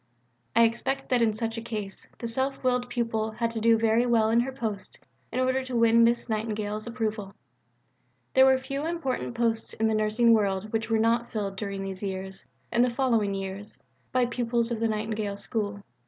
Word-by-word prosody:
I 230 Hz, -, +7 dB
expect 235 Hz, +4 st, 0 dB
that 250 Hz, -2 st, +3 dB
in 225 Hz, -1 st, +4 dB
such 225 Hz, +1 st, -3 dB
a -, -, -7 dB
case 210 Hz, -4 st, -6 dB
the -, -, -6 dB
self 265 Hz, +4 st, -2 dB
willed 250 Hz, -1 st, +1 dB
pupil 225 Hz, -3 st, -1 dB
had 230 Hz, +1 st, -1 dB
to 230 Hz, -, -3 dB
do 230 Hz, 0 st, +5 dB
very 225 Hz, +2 st, +3 dB
well 225 Hz, -2 st, +3 dB
in 230 Hz, -, +4 dB
her 255 Hz, +3 st, 0 dB
post 220 Hz, -7 st, -4 dB, 0.3 s
in 255 Hz, -, -2 dB
order 260 Hz, +1 st, +1 dB
to 255 Hz, -1 st, -5 dB
win 230 Hz, 0 st, +5 dB
Miss 235 Hz, +1 st, +2 dB
Nightingale's 215 Hz, -1 st, -2 dB
approval. 215 Hz, -4 st, -3 dB, 1.0 s
There 265 Hz, 0 st, +7 dB
were 265 Hz, 0 st, +5 dB
few 275 Hz, +3 st, -4 dB
important 315 Hz, -8 st, -2 dB
posts 230 Hz, -1 st, 0 dB
in 225 Hz, -, -1 dB
the 220 Hz, -, +1 dB
nursing 215 Hz, +2 st, +3 dB
world 205 Hz, -1 st, 0 dB
which 225 Hz, 0 st, -1 dB
were 225 Hz, -, +3 dB
not 230 Hz, +2 st, +2 dB
filled 200 Hz, -3 st, -3 dB
during 195 Hz, -1 st, -4 dB
these 190 Hz, -1 st, -6 dB, 0.7 s
and 235 Hz, +1 st, +4 dB
the 250 Hz, -, +3 dB
following 235 Hz, -5 st, +1 dB
years 195 Hz, +2 st, -6 dB, 0.3 s
by 255 Hz, -1 st, +3 dB
pupils 235 Hz, -1 st, -1 dB
of 230 Hz, -, -1 dB
the 230 Hz, -, +2 dB
Nightingale 215 Hz, -1 st, -2 dB
School. 205 Hz, -1 st, -3 dB
230 Hz, 190 wpm, -27 LUFS, 215-240 Hz, 1.0 s, I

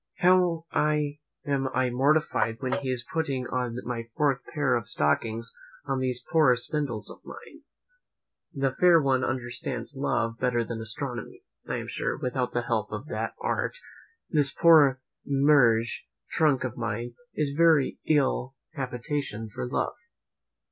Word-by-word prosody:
how 180 Hz, -2 st, +4 dB, 0.8 s
am 140 Hz, -2 st, 0 dB
I 130 Hz, -1 st, +2 dB
mortified 130 Hz, -3 st, +2 dB
when 130 Hz, -, -3 dB
he 135 Hz, -, -1 dB
is 125 Hz, -2 st, 0 dB
putting 140 Hz, -6 st, -1 dB
on 125 Hz, -2 st, -2 dB
my 115 Hz, -2 st, -4 dB
fourth 140 Hz, -3 st, +1 dB
pair 145 Hz, -4 st, +1 dB
of 120 Hz, -2 st, -1 dB
stockings 115 Hz, +8 st, 0 dB, 0.3 s
on 135 Hz, -2 st, -1 dB
these 125 Hz, -1 st, -2 dB
poor 155 Hz, -7 st, +5 dB
spindles 125 Hz, -3 st, -2 dB
of -, -, -14 dB
mine! -, -, -12 dB, 0.9 s
"The 135 Hz, -3 st, -1 dB
fair 175 Hz, 0 st, +6 dB
one 135 Hz, -3 st, +2 dB
understands 125 Hz, +2 st, -3 dB
love 115 Hz, -4 st, -1 dB
better 125 Hz, -2 st, +1 dB
than 115 Hz, 0 st, -5 dB
I -, -, -5 dB
astronomy!" 120 Hz, +1 st, -5 dB, 0.2 s
I -, -, -2 dB
am -, -, -4 dB
sure, -, -, -2 dB
without 125 Hz, 0 st, -2 dB
the 120 Hz, -, -1 dB
help 110 Hz, -3 st, -1 dB
of 105 Hz, +5 st, -5 dB
that 110 Hz, +1 st, -3 dB
art, -, -, -1 dB, 0.5 s
this 145 Hz, -4 st, +4 dB
poor 145 Hz, -6 st, +5 dB, 0.2 s
meagre 135 Hz, -5 st, +4 dB, 0.5 s
trunk 150 Hz, -6 st, +2 dB
of 130 Hz, -1 st, -3 dB
mine 120 Hz, +1 st, -3 dB, 0.2 s
is 150 Hz, -2 st, 0 dB
a -, -, -7 dB
very 160 Hz, -4 st, +4 dB
ill 135 Hz, -3 st, +1 dB, 0.2 s
habitation 125 Hz, -4 st, -4 dB
for 65 Hz, -10 st, -4 dB
love. -, -, -1 dB
130 Hz, 150 wpm, -27 LUFS, 120-145 Hz, 0.9 s, fair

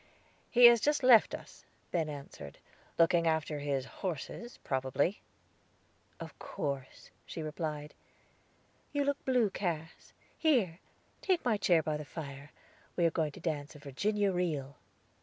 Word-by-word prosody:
"He 245 Hz, 0 st, +7 dB
has 235 Hz, -2 st, +9 dB
just 295 Hz, -1 st, +2 dB
left 245 Hz, -3 st, +7 dB
us," -, -, -13 dB, 0.3 s
Ben 160 Hz, -3 st, 0 dB
answered; 140 Hz, -, -9 dB, 0.4 s
"looking 170 Hz, 0 st, +4 dB
after 160 Hz, -2 st, 0 dB
his 140 Hz, -2 st, -1 dB, 0.2 s
horses, 190 Hz, -, -5 dB
probably." 135 Hz, +7 st, 0 dB, 1.0 s
"Of -, -, -9 dB
course," 140 Hz, -2 st, -5 dB
she 160 Hz, -, -6 dB
replied. 150 Hz, -1 st, -4 dB, 1.0 s
"You 285 Hz, -1 st, +1 dB
look 285 Hz, 0 st, -1 dB
blue, 245 Hz, -6 st, +3 dB
Cass. 165 Hz, -5 st, -4 dB, 0.3 s
Here, 230 Hz, -, +2 dB, 0.4 s
take 365 Hz, -7 st, +1 dB
my 235 Hz, -3 st, +3 dB
chair 175 Hz, -5 st, +3 dB
by 155 Hz, 0 st, -1 dB
the 150 Hz, -, -6 dB
fire; 140 Hz, -2 st, -8 dB, 0.5 s
we 175 Hz, -, +2 dB
are 165 Hz, -, +4 dB
going 155 Hz, -3 st, -1 dB
to -, -, -11 dB
dance 150 Hz, -2 st, -3 dB
a -, -, -9 dB
Virginia 200 Hz, +9 st, 0 dB
reel." 155 Hz, -7 st, -2 dB
165 Hz, 140 wpm, -32 LUFS, 145-210 Hz, 1.0 s, has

